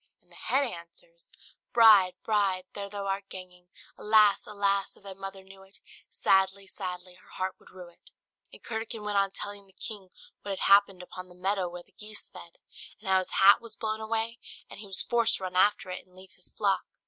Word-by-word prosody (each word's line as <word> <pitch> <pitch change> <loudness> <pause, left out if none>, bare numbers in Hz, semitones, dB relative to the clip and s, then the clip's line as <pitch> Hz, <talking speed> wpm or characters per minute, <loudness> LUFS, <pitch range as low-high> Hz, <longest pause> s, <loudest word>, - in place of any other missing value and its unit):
'" - - -53
and - - -26
the - - -12
head 275 +1 +1
answers - - -11 0.4
"'Bride, 210 -6 +7
bride, 200 -4 +1
there 200 -1 -5
thou 200 -1 -5
art 195 0 -3
ganging! 180 -1 -11 0.3
Alas! 210 -1 +4
alas! 200 -1 0
if - - -22
thy 195 -1 -8
mother 195 0 -8
knew 190 0 -15
it, 195 +1 -16 0.3
Sadly, 190 +1 +2
sadly 180 -1 -7
her - - -23
heart 185 0 -2
would - - -19
rue 180 -2 -11
it.'" 170 - -19 0.4
And - - -15
Curdken 225 -1 -5
went 205 -1 +1
on 195 0 +2
telling 200 0 -7
the 190 - -24
king 195 0 -6 0.3
what 195 -1 -4
had - - +1
happened 200 -2 +4
upon 185 0 -10
the 180 - -15
meadow 190 0 -1
where 175 0 -9
the - - -31
geese 210 +2 -9
fed; 170 - -13 0.4
and 210 - -11
how 190 0 +5
his 185 - -3
hat 200 +4 +8
was 230 -2 -8
blown 220 0 -3
away, 225 +1 -2 0.3
and - - -9
he 210 - -8
was 195 - 0
forced 235 -1 +3
to - - -9
run 185 -1 -4
after 190 0 +3
it, 180 - -6
and 185 0 -26
leave 185 0 -14
his 180 - -11
flock. 200 -3 +1
195 Hz, 215 wpm, -29 LUFS, 185-210 Hz, 0.4 s, hat